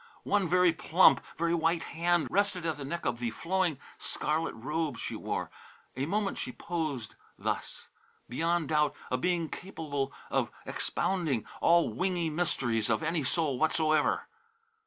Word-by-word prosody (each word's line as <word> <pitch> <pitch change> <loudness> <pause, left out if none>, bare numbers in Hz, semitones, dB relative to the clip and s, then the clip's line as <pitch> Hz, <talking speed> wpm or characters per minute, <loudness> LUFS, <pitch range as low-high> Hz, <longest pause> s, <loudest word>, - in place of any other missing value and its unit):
One 200 -4 +1
very 180 -1 +5
plump, 170 +3 +5 0.2
very 170 +1 +1
white 165 0 +2
hand 170 0 +1
rested 195 -3 +1
at 160 -3 0
the 145 - -6
neck 170 +5 -4
of 120 - 0
the 120 -1 -1
flowing 170 +4 0 0.2
scarlet 160 +2 -1
robe 150 +2 -2
she - - -4
wore. - - -3 0.4
A 135 +3 -1
moment 200 +2 0
she - - -3
posed 155 -8 -3 0.2
thus, - - -3 0.4
beyond 165 +5 0
doubt 150 -2 +2 0.2
a 130 - +1
being 175 +2 +1
capable 145 -7 -4 0.2
of - - +1 0.2
expounding 160 - 0 0.2
all 170 0 +4
wingy 175 -3 0
mysteries 125 -9 0
of 110 +4 +1
any 165 -1 0
soul 140 -1 0
whatsoever. 155 0 +2
160 Hz, 145 wpm, -30 LUFS, 140-175 Hz, 0.4 s, very